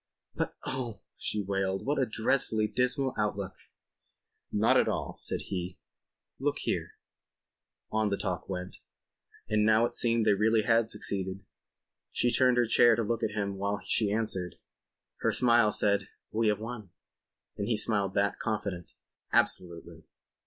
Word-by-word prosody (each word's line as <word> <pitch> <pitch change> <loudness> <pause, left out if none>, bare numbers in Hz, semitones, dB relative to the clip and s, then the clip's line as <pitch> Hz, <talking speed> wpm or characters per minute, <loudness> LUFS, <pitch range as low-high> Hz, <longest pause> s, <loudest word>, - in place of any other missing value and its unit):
"But - - -3
oh," 125 -5 -4
she 105 -1 -2
wailed. 95 -1 -1
"What 140 0 +1
a 130 - +1
dreadfully 110 -1 +1
dismal 125 +3 +1
outlook." 100 -2 -1 1.0
"Not - - +3
at - - +4
all," - - -2
said - - -3
he. 90 -2 -5 0.6
"Look - - 0
here.. - - -2 0.5
." - - -54
On 110 -1 +1
the 100 - -1
talk 90 -2 -3
went. 90 -1 -5 0.7
And 110 0 +2
now 110 +2 +5
it - - -3
seemed 115 -2 +2
they - - +5
really 110 +2 +3
had 115 -1 +3
succeeded. 95 -3 -3 0.7
She 120 - +1
turned 125 0 +4
in 120 - +5
her - - -2
chair 115 0 +6
to 115 - 0
look 115 +2 -1
at 110 -2 -1
him 100 -2 -2
while 100 +1 -1
she 105 0 +2
answered. 100 -5 -1 0.6
Her - - +1
smile 120 -3 +4
said: 100 -1 +1 0.2
"We 110 +1 +1
have 105 -1 +2
won." 110 -3 -7 0.7
And 100 - -3
he 115 -2 +1
smiled 100 -3 +1
back, 100 0 +1
confident: 100 -6 -3 0.4
"Absolutely." 85 -1 -1
105 Hz, 155 wpm, -29 LUFS, 100-115 Hz, 1.0 s, chair